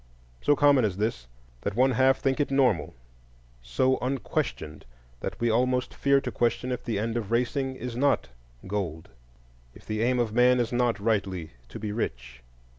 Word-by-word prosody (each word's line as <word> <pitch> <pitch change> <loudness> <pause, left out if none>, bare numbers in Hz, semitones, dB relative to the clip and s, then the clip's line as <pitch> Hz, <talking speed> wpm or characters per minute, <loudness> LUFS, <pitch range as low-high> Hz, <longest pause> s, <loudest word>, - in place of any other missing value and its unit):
So 145 - +3
common 145 -2 +5
is 100 -4 0
this 105 - -2 0.3
that 100 - -3
one 130 +3 +4
half 130 +2 +4
think 135 0 0
it 145 - +1
normal; 105 - +1 0.7
so 95 - +1
unquestioned, 125 - -3 0.4
that - - -5
we 120 -1 +1
almost 125 +2 +1
fear 140 0 +3
to - - -4
question 120 +1 0
if 125 - -3
the 115 -4 -2
end 115 +3 -1
of 110 -4 -4
racing 130 +3 0
is 125 -2 -6
not 140 - +1 0.4
gold, 90 -5 -4 0.7
if - - -16
the 110 0 -2
aim 125 +2 +2
of 120 -3 0
man 125 +1 +4
is 120 0 -1
not 120 -2 +1
rightly 100 -6 -1 0.2
to - - -8
be 105 -1 -4
rich. - - -4
120 Hz, 175 wpm, -27 LUFS, 100-130 Hz, 0.7 s, common